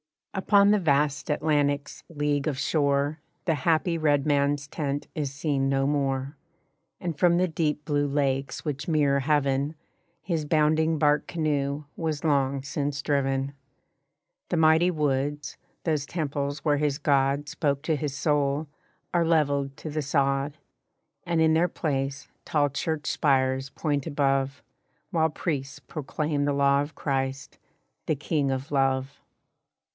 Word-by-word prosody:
Upon 200 +1 +4
the 210 - +4
vast 145 -3 +1
Atlantic's 145 -1 0
leagues 145 -2 -1
of 145 -4 -1
shore 145 +1 +1 0.3
The 165 - +2
happy 160 +3 +1
red 145 -3 +2
man's 145 -1 +1
tent 145 0 -3
is 145 -3 -2
seen 140 -1 0
no 135 0 +1
more; 140 0 -1 0.6
And 170 -4 -4
from 175 -1 +4
the 180 0 +2
deep 150 -2 -1
blue 145 -1 +1
lakes 140 -1 -1
which 145 -1 -3
mirror 145 -4 +3
heaven 140 +1 +1 0.5
His 165 -4 -1
bounding 155 +1 +2
bark 150 -1 +2
canoe 145 -3 -1
was 155 -3 -2
long 140 -3 +1
since 140 0 -2
driven. 135 -1 0 1.0
The 175 - 0
mighty 160 +2 +5
woods, 145 -2 -1 0.3
those 150 -4 0
temples 145 -3 -2
where 150 -2 +1
his 145 -1 0
God 140 -1 +1
Spoke 140 -1 -1
to 160 -1 +1
his 145 -1 -3
soul, 145 0 +1 0.5
are 170 -1 +3
leveled 140 -4 +1
to 155 - -6
the 155 +1 -2
sod; 140 0 0 0.7
And 170 -2 +1
in 160 0 +4
their 165 +2 +3
place 140 -4 -3 0.2
tall 145 -2 +2
church 150 +2 -3
spires 135 -2 +1
point 145 -1 -2
above, 135 -2 0 0.5
While 160 -3 +2
priests 140 -4 -3
proclaim 150 -1 -2
the 145 - +1
law 140 0 +3
of 145 +2 -6
Christ, 135 -1 -3 0.5
the 155 - +2
King 145 0 -1
of 135 +1 -3
Love. 135 0 0
145 Hz, 140 wpm, -26 LUFS, 140-155 Hz, 1.0 s, mighty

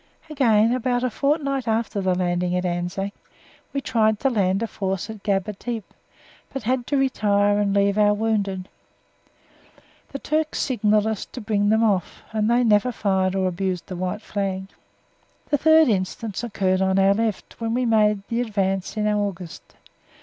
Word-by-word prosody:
Again, 230 -5 +3
about 250 0 0
a 255 - 0
fortnight 275 -2 0
after 220 -2 -1
the 185 -1 +1
landing 180 0 0
at 180 - -2
Anzac, 180 +3 -2 0.6
we 275 - -2
tried 220 -4 +1
to 270 - +2
land 195 -2 +1
a - - +1
force 195 0 -3
at 215 -2 -10
Gaba 200 0 -1
Tepe, 225 +1 -6 0.6
but 270 - -5
had 245 +1 -1
to 285 - +1
retire 205 -6 +2
and 200 -1 +1
leave 200 +1 +2
our 210 0 +4
wounded. 200 -4 -1 1.4
The 275 - -4
Turks 310 +2 -1
signalled 215 -5 +2
us 220 -2 -2
to - - -9
bring 210 -2 0
them 220 +1 +3
off, 195 -6 0
and 215 0 0
then 235 - +4
they 215 - +5
never 210 +5 +3
fired 190 -3 0
or 190 -1 +1
abused 185 -1 -2
the 185 - -7
white 185 +4 -3
flag. 195 -2 -3 0.8
The 290 - +2
third 315 +1 +6
instance 205 +1 -2
occurred 190 -5 0
on 190 0 +2
our 195 0 +5
left, 220 +1 -3
when 225 0 -1
we 250 0 +1
made 210 -3 +3
the 235 +1 -1
advance 195 -3 -2
in 210 0 +1
August. 200 -5 -3
210 Hz, 170 wpm, -23 LUFS, 195-230 Hz, 1.4 s, third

